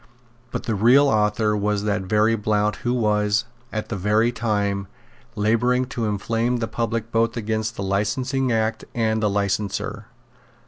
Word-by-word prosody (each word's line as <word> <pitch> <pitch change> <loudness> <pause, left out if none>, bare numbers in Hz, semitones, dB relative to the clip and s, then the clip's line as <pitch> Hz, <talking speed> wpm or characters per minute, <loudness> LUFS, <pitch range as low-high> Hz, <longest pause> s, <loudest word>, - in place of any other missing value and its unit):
But - - -4
the 115 - -1
real 120 +8 +5
author 105 -1 +2
was 105 0 0
that 105 -1 0
very 105 +4 +2
Blount 105 0 0
who 120 - -2
was, 105 -3 +1 0.3
at 110 -1 -4
that 115 - -2
very 105 +5 +2
time, 100 -4 -1 0.5
labouring 115 +4 +2
to 120 -4 -2
inflame 115 +4 0
the 115 -1 -2
public 115 0 -3
both 115 +1 +1
against 110 0 -2
the 100 - -4
Licensing 125 +7 0
Act 110 -1 0
and 110 -1 +1
the 105 - +2
licenser. 100 0 -2
110 Hz, 150 wpm, -23 LUFS, 105-115 Hz, 0.5 s, real